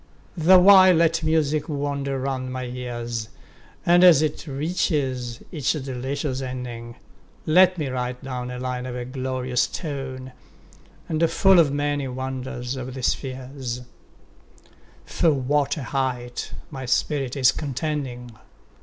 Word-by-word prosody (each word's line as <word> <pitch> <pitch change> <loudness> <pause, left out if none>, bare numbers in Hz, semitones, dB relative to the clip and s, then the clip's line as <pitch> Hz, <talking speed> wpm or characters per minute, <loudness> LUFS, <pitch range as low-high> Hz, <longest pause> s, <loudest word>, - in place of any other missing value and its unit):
The 180 +2 +6
while 185 0 +8
let 165 0 +3
music 155 -1 +1
wander 140 -2 -2
round 130 -1 -3
my 130 0 -4
ears, 120 -2 -5 0.6
And 175 +1 +5
as 165 -5 +7
it 155 +1 -3
reaches 135 -5 -2
each 150 -6 0
delicious 135 -1 -3
ending, 125 -2 -6 0.5
10 155 - -1
Let 185 +1 +6
me 150 -4 -2
write 125 0 -4
down 125 -2 -4
a 125 - -5
line 125 0 -4
of 125 0 -5
glorious 130 -1 -1
tone, 135 -5 -6 0.8
And 160 +1 +1
full 195 -2 +5
of 155 -4 +4
many 145 -1 -1
wonders 130 -1 -4
of 130 0 -6
the 130 - -6
spheres: 130 -1 -3 1.2
For 165 - +1
what 140 +2 0
a 145 - -4
height 125 -2 -3 0.2
my 135 -3 -6
spirit 135 0 0
is 130 -1 +5
contending! 135 -4 -4
135 Hz, 130 wpm, -24 LUFS, 125-150 Hz, 1.2 s, while